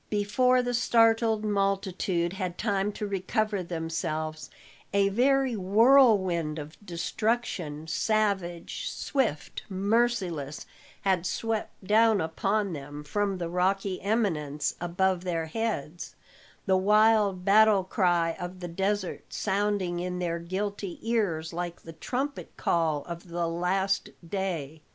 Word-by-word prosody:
Before 250 Hz, +5 st, +2 dB
the 245 Hz, 0 st, -2 dB
startled 225 Hz, -2 st, +3 dB
multitude 195 Hz, -3 st, 0 dB
had 185 Hz, -3 st, -4 dB
time 205 Hz, -2 st, 0 dB
to 210 Hz, -, -4 dB
recover 200 Hz, +1 st, -1 dB
themselves, 160 Hz, -2 st, -3 dB, 0.4 s
a 200 Hz, 0 st, +3 dB
very 260 Hz, +3 st, +2 dB
whirlwind 195 Hz, -, +4 dB
of 150 Hz, +1 st, -7 dB
destruction, 175 Hz, -4 st, -2 dB
savage, 200 Hz, -, -1 dB
swift, 240 Hz, -, -2 dB
merciless, 195 Hz, -, 0 dB, 0.4 s
had 185 Hz, -2 st, +1 dB
swept 225 Hz, -3 st, -3 dB
down 220 Hz, +1 st, +4 dB
upon 195 Hz, +5 st, 0 dB
them 145 Hz, 0 st, -7 dB
from 200 Hz, +5 st, -1 dB
the 175 Hz, -2 st, -3 dB
rocky 185 Hz, +2 st, 0 dB
eminence 165 Hz, -9 st, 0 dB
above 180 Hz, +1 st, 0 dB
their 170 Hz, -3 st, -1 dB
heads, 175 Hz, -4 st, -4 dB, 0.5 s
the 190 Hz, -1 st, +3 dB
wild 210 Hz, -1 st, +3 dB
battle 210 Hz, -1 st, +5 dB
cry 175 Hz, -3 st, +1 dB
of 180 Hz, +1 st, -6 dB
the 175 Hz, -, -5 dB
desert 195 Hz, +2 st, -2 dB
sounding 200 Hz, -3 st, 0 dB
in 180 Hz, 0 st, -3 dB
their 170 Hz, -1 st, -2 dB
guilty 195 Hz, +2 st, -4 dB
ears 200 Hz, -9 st, -1 dB
like 175 Hz, 0 st, -4 dB
the 165 Hz, -, -9 dB
trumpet 270 Hz, -, -4 dB
call 160 Hz, -4 st, +1 dB
of 170 Hz, +1 st, -8 dB
the 170 Hz, 0 st, -2 dB
last 190 Hz, +3 st, 0 dB, 0.2 s
day. 165 Hz, -6 st, -3 dB
190 Hz, 120 wpm, -28 LUFS, 170-215 Hz, 0.5 s, battle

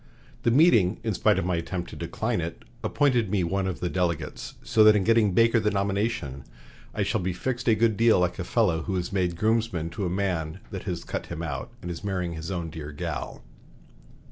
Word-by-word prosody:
The -, -, +2 dB
meeting, 115 Hz, -, +4 dB
in -, -, 0 dB
spite -, -, +3 dB
of -, -, 0 dB
my 90 Hz, -2 st, 0 dB
attempt 90 Hz, +1 st, -4 dB
to -, -, -8 dB
decline -, -, -2 dB
it, 85 Hz, +1 st, -6 dB, 0.2 s
appointed 125 Hz, -8 st, +2 dB
me 95 Hz, -2 st, +1 dB
one 95 Hz, +3 st, 0 dB
of 95 Hz, -, -4 dB
the 90 Hz, -, 0 dB
delegates, 90 Hz, -3 st, -2 dB
so 110 Hz, -, +4 dB
that 105 Hz, 0 st, +8 dB
in 100 Hz, -, +2 dB
getting 110 Hz, -2 st, +3 dB
Baker 115 Hz, +3 st, +4 dB
the 105 Hz, -1 st, +1 dB
nomination 100 Hz, -, -1 dB, 0.5 s
I -, -, -1 dB
shall -, -, 0 dB
be 90 Hz, 0 st, -1 dB
fixed 120 Hz, +8 st, -3 dB
a 115 Hz, -, +5 dB
good 110 Hz, -1 st, +2 dB
deal 115 Hz, -3 st, +5 dB
like 90 Hz, +1 st, 0 dB
a -, -, -1 dB
fellow 90 Hz, -5 st, +1 dB
who 95 Hz, +4 st, -3 dB
is 90 Hz, +1 st, -3 dB
made 90 Hz, -3 st, 0 dB
groomsman 110 Hz, -6 st, 0 dB
to 95 Hz, +3 st, -2 dB
a -, -, -1 dB
man 90 Hz, -3 st, -2 dB
that 95 Hz, -, -6 dB
has 85 Hz, -3 st, -3 dB
cut -, -, -5 dB
him 85 Hz, -1 st, -5 dB
out 70 Hz, -6 st, -4 dB
and 90 Hz, -, -4 dB
is 85 Hz, -, -7 dB
marrying 90 Hz, -4 st, -2 dB
his 80 Hz, +1 st, -6 dB
own 85 Hz, -4 st, -3 dB
dear 75 Hz, -1 st, -7 dB
'gal.'" 75 Hz, -, -5 dB
95 Hz, 220 wpm, -26 LUFS, 85-110 Hz, 0.5 s, that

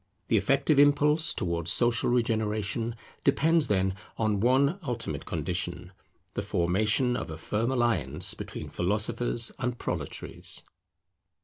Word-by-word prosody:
The 110 Hz, -, +4 dB
effective 140 Hz, +6 st, +2 dB
impulse 150 Hz, +3 st, +4 dB
towards 85 Hz, -1 st, 0 dB
social 120 Hz, -1 st, +3 dB
regeneration 115 Hz, -1 st, 0 dB, 0.3 s
depends, 160 Hz, +3 st, +3 dB
then, 95 Hz, -2 st, +1 dB, 0.2 s
on 110 Hz, -2 st, +1 dB
one 135 Hz, -, +3 dB
ultimate 115 Hz, -, -4 dB
condition; -, -, -3 dB, 0.4 s
the -, -, -2 dB
formation 105 Hz, +6 st, +1 dB
of -, -, -4 dB
a 80 Hz, -, -6 dB
firm 105 Hz, +8 st, -1 dB
alliance 90 Hz, -, 0 dB
between -, -, -7 dB
philosophers 110 Hz, +5 st, 0 dB
and 125 Hz, -2 st, -2 dB
proletaries. -, -, -5 dB
115 Hz, 115 wpm, -28 LUFS, 100-130 Hz, 0.4 s, The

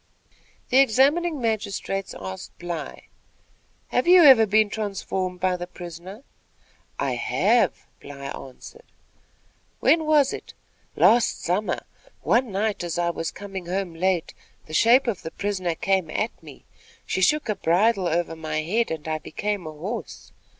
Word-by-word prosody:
The 255 Hz, -, +5 dB
examining 280 Hz, +6 st, +3 dB
magistrates 205 Hz, -4 st, -2 dB
asked 95 Hz, 0 st, -8 dB
Bly: 175 Hz, -3 st, -6 dB, 0.9 s
"Have -, -, 0 dB
you 360 Hz, -1 st, +8 dB
ever 255 Hz, -7 st, +8 dB
been 215 Hz, +1 st, +4 dB
transformed 195 Hz, -3 st, -3 dB
by 185 Hz, 0 st, +1 dB
the 175 Hz, 0 st, -6 dB
prisoner?" 180 Hz, +5 st, -10 dB, 0.7 s
"I -, -, -1 dB
have," -, -, +1 dB
Bly 140 Hz, -1 st, -10 dB
answered. 140 Hz, -, -11 dB, 0.9 s
"When 320 Hz, -1 st, +3 dB
was 295 Hz, -3 st, +4 dB
it?" -, -, -9 dB, 0.4 s
"Last 235 Hz, 0 st, +3 dB
summer. 180 Hz, +1 st, -1 dB, 0.4 s
One 235 Hz, -, +2 dB
night, 200 Hz, 0 st, -1 dB
as 170 Hz, -1 st, -3 dB
I 170 Hz, 0 st, +1 dB
was 165 Hz, -1 st, -3 dB
coming 195 Hz, -3 st, -8 dB
home 185 Hz, -1 st, -2 dB
late, 180 Hz, 0 st, -1 dB, 0.3 s
the 155 Hz, -, -12 dB
shape 235 Hz, -, +5 dB
of 230 Hz, -7 st, -2 dB
the 160 Hz, -, -6 dB
prisoner 185 Hz, -3 st, -2 dB
came 190 Hz, -2 st, 0 dB
at 215 Hz, +8 st, -1 dB
me. -, -, -14 dB, 0.4 s
She 190 Hz, -, -2 dB
shook 300 Hz, +10 st, +2 dB
a 215 Hz, -, 0 dB
bridle 195 Hz, +2 st, +2 dB
over 170 Hz, 0 st, -1 dB
my 155 Hz, -1 st, -3 dB
head 225 Hz, +8 st, 0 dB
and 160 Hz, -1 st, -5 dB
I 155 Hz, 0 st, -1 dB
became 205 Hz, +2 st, -4 dB
a -, -, -5 dB
horse. 185 Hz, +10 st, -7 dB
195 Hz, 145 wpm, -24 LUFS, 170-225 Hz, 0.9 s, you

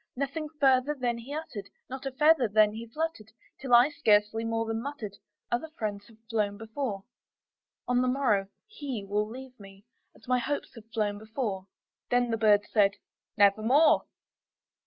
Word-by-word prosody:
Nothing 280 Hz, +4 st, -3 dB
further 270 Hz, +1 st, +3 dB
then 240 Hz, -2 st, -1 dB
he 240 Hz, +4 st, -10 dB
uttered 245 Hz, -10 st, -6 dB, 0.2 s
not 265 Hz, +1 st, -6 dB
a -, -, -3 dB
feather 300 Hz, -1 st, +4 dB
then 210 Hz, 0 st, +4 dB
he 230 Hz, +2 st, -7 dB
fluttered 265 Hz, -4 st, -4 dB, 0.3 s
Till 255 Hz, -3 st, +3 dB
I 245 Hz, +4 st, +7 dB
scarcely 220 Hz, -6 st, +2 dB
more 225 Hz, 0 st, -1 dB
than 225 Hz, 0 st, -2 dB
muttered, 235 Hz, -7 st, -6 dB, 0.4 s
"Other 240 Hz, +7 st, -1 dB
friends 205 Hz, -2 st, -4 dB
have 225 Hz, -, -19 dB
flown 210 Hz, -3 st, -1 dB
before 220 Hz, -2 st, -4 dB, 0.8 s
On 250 Hz, 0 st, +2 dB
the 255 Hz, -, +1 dB
morrow 250 Hz, -7 st, +1 dB, 0.2 s
he 280 Hz, -, -6 dB
will 210 Hz, +1 st, 0 dB
leave 255 Hz, +1 st, -10 dB
me, 195 Hz, 0 st, -14 dB, 0.3 s
as 225 Hz, -, -20 dB
my 250 Hz, 0 st, +2 dB
hopes 285 Hz, +4 st, -3 dB
have 225 Hz, -2 st, -14 dB
flown 210 Hz, -2 st, -1 dB
before." 215 Hz, -4 st, -4 dB, 0.4 s
Then 245 Hz, -1 st, +2 dB
the 225 Hz, -, 0 dB
bird 210 Hz, -2 st, +5 dB
said, 200 Hz, -2 st, +3 dB, 0.4 s
"Nevermore." 220 Hz, +9 st, +5 dB
230 Hz, 160 wpm, -29 LUFS, 210-265 Hz, 0.8 s, I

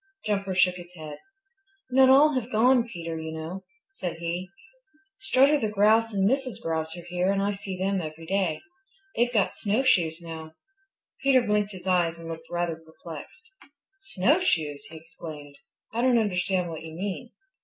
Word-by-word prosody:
Jumper 200 Hz, -3 st, -1 dB
shook 180 Hz, 0 st, +4 dB
his 175 Hz, 0 st, -11 dB
head. 155 Hz, -3 st, -8 dB, 0.7 s
"Not 260 Hz, +1 st, +6 dB
all 290 Hz, +3 st, +7 dB
have 255 Hz, -2 st, -2 dB
gone, 240 Hz, +2 st, +4 dB
Peter, 165 Hz, -1 st, -5 dB
you 160 Hz, 0 st, -5 dB
know," 160 Hz, +4 st, -6 dB, 0.3 s
said 185 Hz, -, -5 dB
he. 170 Hz, +2 st, -3 dB, 0.7 s
"Strutter 280 Hz, +3 st, +4 dB
the 220 Hz, -, 0 dB
Grouse 215 Hz, +2 st, +4 dB
and 195 Hz, -2 st, +2 dB
Mrs. 260 Hz, -1 st, 0 dB
Grouse 160 Hz, 0 st, -3 dB
are 175 Hz, -, -9 dB
here, 180 Hz, +2 st, +1 dB
and 200 Hz, -, +1 dB
I 200 Hz, +1 st, +1 dB
see 195 Hz, -2 st, -5 dB
them 190 Hz, 0 st, 0 dB
every 160 Hz, 0 st, -7 dB
day. 185 Hz, -2 st, 0 dB, 0.5 s
They've 240 Hz, +1 st, +2 dB
got 210 Hz, -5 st, +2 dB
snowshoes 200 Hz, -7 st, +2 dB
now." 160 Hz, -2 st, -8 dB, 0.7 s
Peter 270 Hz, -2 st, +5 dB
blinked 210 Hz, -2 st, 0 dB
his 185 Hz, -1 st, -10 dB
eyes 175 Hz, -3 st, +2 dB
and 165 Hz, 0 st, -9 dB
looked 165 Hz, 0 st, -7 dB
rather 175 Hz, -2 st, -1 dB
perplexed. 160 Hz, -, -11 dB, 0.5 s
"Snowshoes!" 185 Hz, -, +1 dB
he 160 Hz, +2 st, -10 dB
exclaimed. 155 Hz, -3 st, -10 dB, 0.3 s
"I 235 Hz, -, 0 dB
don't 250 Hz, -1 st, +4 dB
understand 185 Hz, -4 st, 0 dB
what 160 Hz, -, -6 dB
you 160 Hz, 0 st, -9 dB
mean." 200 Hz, +6 st, -4 dB
185 Hz, 165 wpm, -27 LUFS, 165-220 Hz, 0.7 s, all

